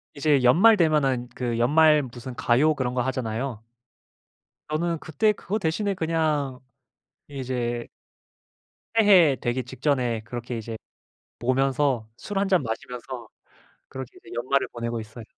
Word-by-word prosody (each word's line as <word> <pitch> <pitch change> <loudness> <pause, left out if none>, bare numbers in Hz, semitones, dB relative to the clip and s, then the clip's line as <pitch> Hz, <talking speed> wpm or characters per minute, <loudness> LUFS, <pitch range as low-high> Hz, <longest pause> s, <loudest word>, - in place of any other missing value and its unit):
이제 140 -2 +2
연말 180 - +7
되면은 140 -8 +2
그 120 -2 -2
연말 150 +4 +5
무슨 125 0 -8
가요 145 +8 +3
그런 125 -3 -2
거 125 - 0
하잖아요. 120 -2 -3 1.1
저는 165 +2 -1
그때 160 +9 +1
그거 210 +1 -3
대신에 200 +5 0
그냥 155 -6 -1 0.7
이제 125 -4 -3 1.1
새해 185 -10 +6
되기 120 +2 -2
직전에 125 -2 -1
그렇게 120 +2 -6
이제 115 0 -6 0.6
보면서 130 -1 +1
술 200 -1 -3
한 200 - +1
잔 185 -5 +3
마시면서 120 +1 -6 0.6
그렇게 130 -2 -7
이제 - - -16
연말을 130 +4 0
보내고 115 -1 -4
있어요. 110 +1 -10
130 Hz, 275 characters per minute, -25 LUFS, 120-155 Hz, 1.1 s, 연말